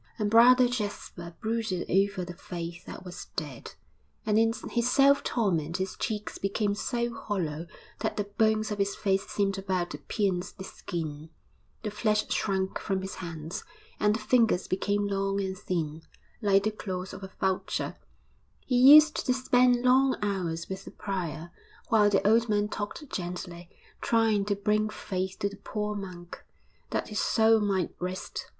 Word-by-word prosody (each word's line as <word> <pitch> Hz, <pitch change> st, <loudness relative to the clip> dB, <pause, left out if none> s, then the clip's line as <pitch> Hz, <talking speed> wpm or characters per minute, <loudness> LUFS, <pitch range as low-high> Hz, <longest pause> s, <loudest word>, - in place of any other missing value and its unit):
And 210 Hz, -2 st, -1 dB
Brother 245 Hz, +2 st, +7 dB
Jasper 205 Hz, -7 st, -5 dB
brooded 220 Hz, -5 st, -2 dB
over 195 Hz, -1 st, +1 dB
the 175 Hz, -, -7 dB
faith 175 Hz, -2 st, -7 dB
that -, -, -9 dB
was 180 Hz, -1 st, -8 dB
dead; 140 Hz, -6 st, -6 dB, 0.5 s
and 215 Hz, 0 st, +3 dB
in 225 Hz, 0 st, +4 dB, 0.2 s
his 240 Hz, 0 st, +1 dB
self 280 Hz, +1 st, +5 dB
torment 170 Hz, -8 st, 0 dB
his 190 Hz, 0 st, -3 dB
cheeks 210 Hz, -1 st, -4 dB
became 200 Hz, +1 st, 0 dB
so 235 Hz, +3 st, -2 dB
hollow 170 Hz, -7 st, -3 dB, 0.3 s
that -, -, -2 dB
the 205 Hz, -, +1 dB
bones 215 Hz, +1 st, +1 dB
of 205 Hz, -, -3 dB
his 200 Hz, 0 st, 0 dB
face 195 Hz, -1 st, 0 dB
seemed 195 Hz, -1 st, 0 dB
about 185 Hz, -2 st, -1 dB
to 145 Hz, -, -6 dB
pierce 185 Hz, -, -1 dB
the 190 Hz, -, -9 dB
skin, 160 Hz, -4 st, -6 dB, 0.5 s
the 210 Hz, -, -2 dB
flesh 210 Hz, 0 st, +1 dB
shrunk 190 Hz, -2 st, 0 dB
from 190 Hz, -1 st, -2 dB
his 190 Hz, -, -5 dB
hands, 165 Hz, -2 st, -6 dB, 0.4 s
and 210 Hz, 0 st, +3 dB
the -, -, -3 dB
fingers 225 Hz, -5 st, +2 dB
became 205 Hz, +2 st, 0 dB
long 195 Hz, 0 st, 0 dB
and 190 Hz, -1 st, -2 dB
thin, 165 Hz, -4 st, -3 dB, 0.4 s
like 200 Hz, -2 st, +4 dB
the 215 Hz, -, +1 dB
claws 190 Hz, -3 st, -5 dB
of -, -, -8 dB
a 190 Hz, -, -7 dB
vulture. 190 Hz, -1 st, -1 dB, 0.7 s
He 250 Hz, -, +1 dB, 0.2 s
used 305 Hz, 0 st, +6 dB
to 255 Hz, -, +4 dB
spend 250 Hz, -1 st, +3 dB
long 260 Hz, +1 st, +4 dB
hours 175 Hz, -5 st, -2 dB
with 190 Hz, 0 st, -6 dB
the -, -, -7 dB
prior, 170 Hz, -4 st, -4 dB, 0.4 s
while 210 Hz, -2 st, +5 dB
the 200 Hz, 0 st, +2 dB
old 230 Hz, +2 st, +4 dB
man 210 Hz, 0 st, +1 dB
talked 210 Hz, +9 st, -5 dB
gently, 175 Hz, -1 st, -5 dB, 0.3 s
trying 225 Hz, -3 st, +2 dB
to 205 Hz, -1 st, 0 dB
bring 210 Hz, +1 st, +1 dB
faith 190 Hz, -2 st, -4 dB
to 200 Hz, -, +1 dB
the 200 Hz, -, -11 dB
poor 210 Hz, +1 st, -3 dB
monk, 180 Hz, -4 st, -8 dB, 0.5 s
that -, -, -2 dB
his 210 Hz, -, -2 dB
soul 225 Hz, 0 st, +4 dB
might 195 Hz, -4 st, 0 dB
rest. 185 Hz, +1 st, -5 dB
200 Hz, 165 wpm, -28 LUFS, 180-215 Hz, 0.7 s, Brother